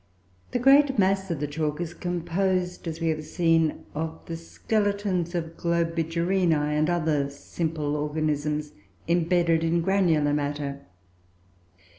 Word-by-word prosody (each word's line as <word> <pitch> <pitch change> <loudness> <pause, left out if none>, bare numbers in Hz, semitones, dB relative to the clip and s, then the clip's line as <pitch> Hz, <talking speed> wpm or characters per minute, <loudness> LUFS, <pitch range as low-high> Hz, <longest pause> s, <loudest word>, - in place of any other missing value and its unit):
The - - -1
great 270 +2 +5
mass 195 -1 +2
of 165 -4 -2
the 150 - -1
chalk 150 +1 -2
is 175 -1 -4
composed, 180 +1 -1
as 160 0 -4
we 165 -1 0
have 155 -1 -1
seen, 165 0 +1
of 160 +1 -4
the 165 - -5
skeletons 200 0 -1
of 165 -1 -3
Globigerinoe, 170 -1 +1
and 155 +2 +2
other 155 -5 +1
simple 150 +1 -3
organisms, 150 0 -1 0.4
imbedded 170 -1 +2
in 165 +1 +2
granular 165 -6 +2
matter. 145 -3 -3
165 Hz, 125 wpm, -26 LUFS, 150-180 Hz, 0.4 s, great